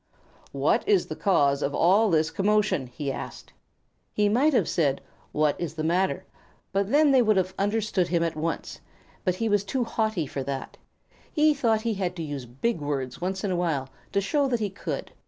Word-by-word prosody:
"What - - +1
is 405 -3 +4
the - - -4
cause 140 -8 +2
of 140 - -1
all 200 +6 +4
this 160 -2 +2
commotion?" 200 -6 +1
he 135 +3 -4
asked. - - -8 0.6
He 210 -1 +2
might 265 +9 +3
have 260 - +2
said, 140 -5 +1 0.3
"What 150 -1 +2
is 165 -2 -3
the 155 - -3
matter?" 185 +3 0 0.5
and 200 +2 0
then 295 0 +5
they 265 -2 +6
would 215 -3 +3
have 185 0 0
understood 205 -3 +1
him 170 -1 +1
at 165 -1 -1
once, 160 +2 -4 0.4
but 185 -3 +1
he 225 +4 -1
was 205 -2 +2
too 245 +6 -1
haughty 220 -7 -1
for 135 0 -5
that. 135 0 -5 0.6
He 305 -1 +4
thought 230 -6 +1
he 230 0 -1
had 185 -3 -2
to 165 - -4
use 145 -5 -5
big 155 - -2
words 135 -2 -3
once 190 +1 -2
in 200 - 0
a - - +1
while 160 -7 -1 0.2
to 200 - +1
show 280 +8 +1
that 245 -3 0
he 210 -3 -2
could. 195 - -5
190 Hz, 200 wpm, -26 LUFS, 155-220 Hz, 0.6 s, they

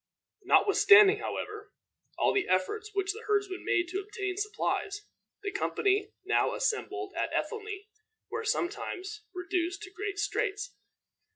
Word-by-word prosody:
Notwithstanding, 405 +1 +7
however, 425 0 -5 0.4
all - - +3
the 405 - +1
efforts 425 - 0
which 390 0 +1
the 445 - -9
herdsman 405 -3 0
made 350 0 +2
to 375 +2 -2
obtain 395 -1 -4
supplies, 415 0 -2 0.4
the 405 - -2
company 405 +1 +1
now 425 - +2
assembled 405 -5 -2
at - - -1
Ethelney 420 -3 -3 0.5
were 455 -1 -2
sometimes 420 0 -3
reduced 365 +1 -2
to 370 - -9
great 400 +1 -4
straits. 405 0 -1
405 Hz, 125 wpm, -30 LUFS, 385-425 Hz, 0.5 s, Notwithstanding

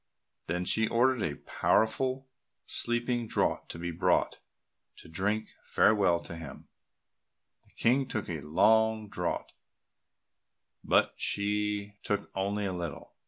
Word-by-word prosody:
Then 90 +1 -1
she 110 +4 +2
ordered 125 +1 +2
a 75 -6 -1
powerful 130 +4 +1 0.4
sleeping 120 0 0
draught - - 0
to - - -6
be 85 +1 -4
brought, 80 - +1 0.6
to - - -14
drink 105 +6 -1
farewell 100 -5 +3
to 85 - -8
him; 80 -5 -9 1.0
the - - -26
King 130 +3 +2
took 110 -5 -3
a 80 -4 -4
long 110 +8 +3
draught, 90 -3 -3 1.3
but - - +3
she 105 0 -1
took 105 - -2
only 100 +2 -1
a 95 - -2
little. 85 -5 -6
105 Hz, 120 wpm, -30 LUFS, 90-110 Hz, 1.3 s, farewell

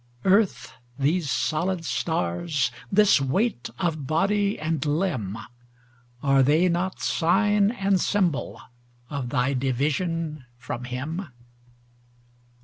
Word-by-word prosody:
Earth, 190 - +2 0.2
these 150 +3 +1
solid 170 +4 -1
stars, 145 - -1 0.2
this 205 -6 +5
weight 135 - 0
of 160 -7 -2
body 200 +6 +1
and 155 -1 -1
limb, 145 - -1 0.9
Are 135 -1 +4
they 155 +7 +4
not 175 +2 -1
sign 205 +4 +2
and 195 -5 +1
symbol 180 -8 0 0.5
of 140 -4 -3
thy 125 +3 +1
division 150 +4 -1
from 120 0 -6
Him? 145 +9 -4
160 Hz, 100 wpm, -25 LUFS, 135-190 Hz, 0.9 s, this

